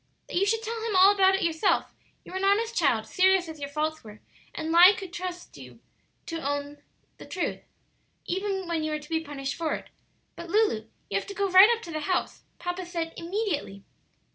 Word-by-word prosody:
"That - - -6
you 390 +3 +2
should 450 +2 0
tell 455 0 -4
him 445 -3 -2
all 380 +2 +8
about 385 -1 +4
it 385 - -1
yourself; 330 +3 +1 0.3
you - - -11
were 375 - -3
an - - -4
honest 445 +4 +2
child, 240 -9 +2
serious 375 +6 +3
as 320 -1 -9
your 280 -1 -5
faults 310 +2 -2
were, 210 -1 -12 0.4
and 320 +1 -3
lie 355 +4 +8
could 375 -3 -8
trust 360 0 -6
you - - -13 0.5
to 330 -1 -5
own 285 0 -4 0.4
the - - -10
truth, 360 - -3 0.7
even 385 0 -2
when 330 -2 -1
you 310 - -1
were 305 - -2
to 295 - -14
be 325 -1 +1
punished 275 -2 -5
for 325 -2 -2
it. - - -10 0.4
But, 340 0 -9
Lulu, 370 - +1 0.2
you 195 - +1
have - - -11
to 400 - -7
go 400 0 0
right 380 +4 +9
up 455 - -12
to 335 - -8
the 310 - -3
house; 360 +4 -2 0.2
papa 355 +1 -4
said 335 -2 -4
'immediately.'" 335 - -3
350 Hz, 215 wpm, -27 LUFS, 310-390 Hz, 0.7 s, right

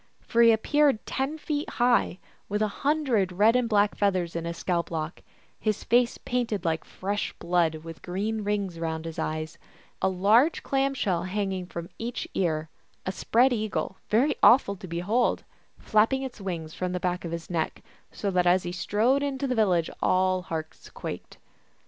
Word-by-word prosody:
For 235 - +1
he 230 -1 +8
appeared 275 +2 +2
ten 275 +4 -2
feet 300 -1 -3
high, 240 -6 +2 0.3
with 210 +1 0
a - - +2
hundred 270 -10 +2
red 210 +6 +4
and 250 -2 +2
black 205 -1 +3
feathers 185 -5 0
in 170 0 -3
his 170 0 -4
scalp 170 -2 -1
lock, 160 0 -4 0.4
his 215 -2 -1
face 240 +1 +3
painted 235 -7 -2
like 160 -1 0
fresh 205 +2 -3
blood 170 -2 +1
with 165 -1 -9
green 210 +4 -2
rings 200 -4 -2
round 160 -1 -3
his 165 -1 -6
eyes, 155 0 -3 0.4
a - - +3
large 210 - +3
clam 275 0 +1
shell 185 -9 0
hanging 190 -1 -2
from 170 -1 -6
each 235 +2 -4
ear, 160 -4 0 0.4
a 185 - -1
spread 245 +6 +3
eagle, 215 -4 -2
very 260 +8 +3
awful 235 -5 +6
to 185 - -9
behold, 180 +9 0 0.3
flapping 225 +5 +2
its 255 -5 -7
wings 165 -5 -4
from 180 0 -3
the 180 - -1
back 180 0 -1
of 170 - -5
his 170 -1 -5
neck, 165 -3 -2 0.3
so 200 - -2
that 180 -1 +2
as 180 +1 +4
he 175 - -4
strode 220 +9 +1
into 280 -1 -2
the 255 - 0
village 185 -8 +2
all 185 0 +2
hearts 160 -3 -6
quaked. - - -7
200 Hz, 175 wpm, -27 LUFS, 175-235 Hz, 0.4 s, he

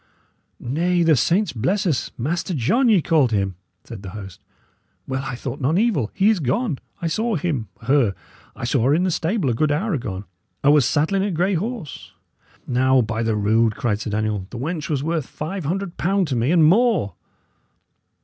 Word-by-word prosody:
"Nay, 170 +7 0
the 165 -2 +5
saints 175 - +1
bless 180 - 0
us! 150 -9 0
Master 165 +7 -2
John, 235 - +2
ye 195 -8 +4
called 145 -7 +3
him," 100 -3 0 0.3
said 115 -5 -9
the 95 - -7
host. 95 -3 -10 0.6
"Well, 130 0 -2
I 135 -2 -4
thought 130 +3 -6
none 145 +7 +2
evil. 200 - +1
He 200 +2 +4
is 210 - 0
gone. 155 - -1 0.2
I - - 0
saw 220 +7 0
him 145 - -2 0.2
her 125 -6 +2 0.4
I - - -9
saw 125 -1 +1
her 140 +3 +4
in 175 - +1
the 185 - +1
stable 165 - 0
a - - 0
good 150 +6 +1
hour 190 +8 0
agone; 105 -9 -4 0.4
'a 140 - +6
was 150 -4 +5
saddling 160 +9 +1
a 205 - 0
grey 180 +2 0
horse." 205 - -5 0.5
"Now, 130 +1 +3
by 110 0 -2
the 115 -1 0
rood!" 110 +2 +2
cried 105 -4 -1
Sir 110 - -4
Daniel, 105 -2 -2
"the 120 - -8
wench 155 +5 -4
was 145 -3 -1
worth 160 -3 -1
five 165 +2 -5
hundred 185 +3 -3
pound 190 0 +1
to 130 - -1
me 120 +3 +1
and 170 -3 +5
more." 195 - +3
150 Hz, 195 wpm, -22 LUFS, 120-180 Hz, 0.6 s, a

